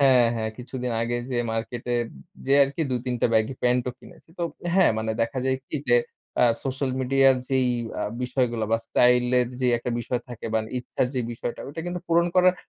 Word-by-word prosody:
হ্যাঁ, 130 -3 +6
হ্যাঁ, 110 -1 -2
কিছুদিন 125 -1 -4
আগে 120 +1 -1
যে, 125 - 0
মার্কেটে 120 +2 -3 0.5
যেয়ে 140 +1 +5
আরকি 140 +4 -3
২-৩ 125 0 -1
টা - - +4
ব্যাগি 110 +4 +2
প্যান্ট 125 0 +3
ও - - -3
কিনেছি। - - -17
তো - - -2 0.3
হ্যাঁ, 190 -1 +6
মানে 110 0 -1
দেখা 115 +3 -2
যায় 130 0 +2
কি - - -3
যে, 120 - +6 0.4
আ - - +7 0.2
সোশ্যাল 135 0 -1
মিডিয়া 135 +1 +4
র - - -3
যেই 130 -2 +2 0.5
বিষয়গুলো 125 -3 0
বা 115 - +4
স্টাইল 125 0 +4 0.2
এর 125 - 0
যে, 125 - +2
একটা 125 - -4
বিষয় 125 +1 -2
থাকে 120 -2 -7
বা - - +4 0.2
ইচ্ছার 125 0 -1
যে, 125 - +1
বিষয়টা 120 +1 -5
ওটা 150 +4 -6
কিন্তু 175 0 -3
পূরণ 170 +1 +4
করার 185 0 +6
125 Hz, 200 wpm, -25 LUFS, 120-135 Hz, 0.5 s, আ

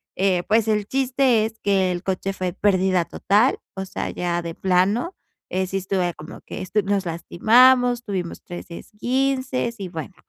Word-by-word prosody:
eh, 185 -2 +2
pues 220 +1 +3
el 210 -2 0
chiste 255 -3 +2
es 220 0 -7
que 190 -2 +1
el 175 -1 -3
coche 195 +1 -2
fue 185 -2 -3
pérdida 185 -3 +2
total, 210 +11 +2 0.2
o 190 0 -4
sea, - - -4
ya 175 -1 -2
de 170 -1 -6
plano, 195 - +1 0.3
eh, 185 0 -1
sí 195 +1 -2
estuve 185 -2 -1
como 155 +3 -11
que - - -8
esto 210 +3 0
nos 195 -1 0
lastimamos, 245 +9 +4
tuvimos 185 -6 -4
3 175 - -8
esguinces 255 +4 -2
y 195 - -4
bueno. 165 +2 -7
195 Hz, 170 wpm, -22 LUFS, 180-235 Hz, 0.3 s, lastimamos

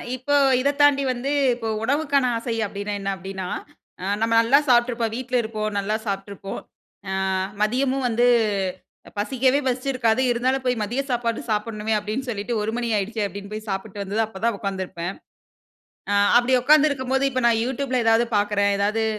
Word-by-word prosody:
இப்போ 275 +3 -1 0.3
இத 280 - +2
தாண்டி 280 -1 +5
வந்து 255 +3 -3 0.2
இப்போ 230 -2 -5 0.2
உணவுக்கான 280 0 +1
ஆசை 230 0 -3
அப்டின்னா 205 +1 -5
என்ன? 195 0 -1
அப்டீன்னா, 190 0 -6 0.5
ஆ - - -7 0.2
நம்ம 230 0 +1
நல்லா 260 +5 +5
சாப்ட்ருப்போம். 240 -2 +2
வீட்ல 255 0 -4
இருப்போம். 215 -1 -3
நல்லா 205 +2 -1
சாப்ட்டுருப்போம். 195 0 -5 0.5
ஆ - - -2 0.5
மதியமும் 255 +4 +1
வந்து 240 +2 +2 0.9
பசிக்கவே 260 +6 +2
பசிச்சிருக்காது. 255 -2 +1
இருந்தாலும் 255 +2 0
போய் 245 -3 0
மதிய 240 +6 -1
சாப்பாடு 235 -2 -1
சாப்புட்ணுமே 215 0 -1
அப்டின்னு 215 +6 -4
சொல்லிட்டு 215 +1 -3
1 215 +1 -1
மணி 240 -1 -2
ஆயிடுச்சே 210 +2 -2
அப்டின்னு 200 +2 -9
போய் 215 +1 -7
சாப்பிட்டு 195 +1 -4
வந்து 200 +2 -6
தான் 225 - +2
அப்ப 190 - -10
தான் 235 -3 +2
உக்காந்துருப்பேன். 190 -3 -4 1.0
ஆ - - +2 0.2
அப்பிடி 245 +2 +2
உக்கார்ந்திருக்கும்போது, 275 -2 +3
இப்ப 255 - -1
நான் 230 -1 +3
யூட்யூப்ல 255 0 -1
எதாவது 225 +1 +4
பாக்கிறேன். 205 0 +1
ஏதாவது, 210 +2 +1
230 Hz, 155 wpm, -23 LUFS, 205-255 Hz, 1.0 s, தாண்டி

